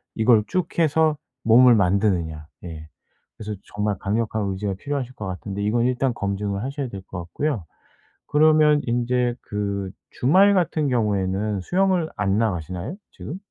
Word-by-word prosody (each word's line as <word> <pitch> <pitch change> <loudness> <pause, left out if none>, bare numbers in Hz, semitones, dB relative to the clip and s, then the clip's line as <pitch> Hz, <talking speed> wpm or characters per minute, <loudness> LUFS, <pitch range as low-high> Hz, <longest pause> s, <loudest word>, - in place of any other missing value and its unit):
이걸 110 -1 +4
쭉 180 +2 -2
해서 155 -1 +3 0.3
몸을 120 +2 +7
만드느냐 90 -6 +1 0.2
네. 80 -3 -8 0.5
그래서 105 -1 -5
정말 105 -1 -2
강력한 110 +1 -1
의지가 95 +1 -3
필요하실 135 +3 -4
것 110 - -6
같은데 100 +2 -5
이건 115 +3 +1
일단 125 0 +1
검증을 100 -1 -3
하셔야 140 0 -3
될 100 -3 -7
것 95 - -6
같고요. 105 - -3 0.6
그러면 155 0 +4
인제 120 0 0
그 100 -2 -3 0.2
주말 190 +10 +4
같은 165 -5 +1
경우에는 105 -3 0
수영을 185 - +1
안 100 +1 +1
나가시나요 90 - -2 0.2
지금? 170 - -7
110 Hz, 315 characters per minute, -23 LUFS, 100-140 Hz, 0.6 s, 몸을